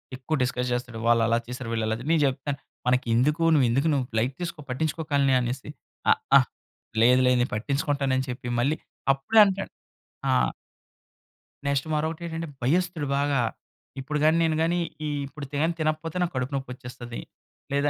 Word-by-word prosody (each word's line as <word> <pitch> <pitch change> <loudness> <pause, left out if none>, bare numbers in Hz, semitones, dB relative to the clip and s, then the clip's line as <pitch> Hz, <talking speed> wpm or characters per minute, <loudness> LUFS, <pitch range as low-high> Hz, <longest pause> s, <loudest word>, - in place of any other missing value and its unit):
ఎక్కువ 135 +5 -2
డిస్కస్ 125 0 -1
చేస్తాడు. 120 -2 -4
వాళ్ళు 120 -1 +5
అలా 115 +1 +3
చేసారు, 125 -1 -6
వీళ్ళు 110 -1 0
ఇలా 110 - 0
చేసారు. 130 +6 -6
నేను 160 -2 +4
చెప్తాను 135 +2 -3 0.3
"మనకెందుకు? 125 +5 +2
నువ్వు 140 -5 +5
ఎందుకు? 135 +7 +2
నువ్వు 135 -3 +1
లైట్ 130 +3 -1
తీసుకో 170 -3 -4
పట్టించుకోకాలని" 140 -1 +1
అనేసి. 125 +4 -4 0.4
"అహా! - - +5 0.6
లేదు. 125 +2 +6
లేదు. 125 -1 +4
నేను 120 - -1
పట్టించుకుంటాను" 140 +3 0
అని 130 - -1
చెప్పి 125 0 -5
మళ్ళీ 145 +6 +1 0.4
అప్పుడే 180 +12 +2
అంటాడు. 195 0 -2 0.6
ఆ! - - +3 1.4
నెక్స్ట్ 140 +2 0
మరొకటేంటంటే, 165 +1 -2 0.2
భయస్తుడు 170 +1 +1
బాగా. 140 -2 +2 0.6
ఇప్పుడు 150 +3 -2
గాని 160 +2 +5
నేను 160 -1 +2
గాని 175 +1 +1 0.3
ఈ - - -1 0.2
ఇప్పుడు 145 0 -8
తిన 145 +2 +1 0.2
తినకపోతే 155 +2 -1
నాకు 175 -2 0
కడుపు 130 +2 -2
నొప్పొచ్చేస్తది. 125 -2 -6 0.5
లేదా, 140 +1 +2
140 Hz, 155 wpm, -26 LUFS, 125-155 Hz, 1.4 s, లేదు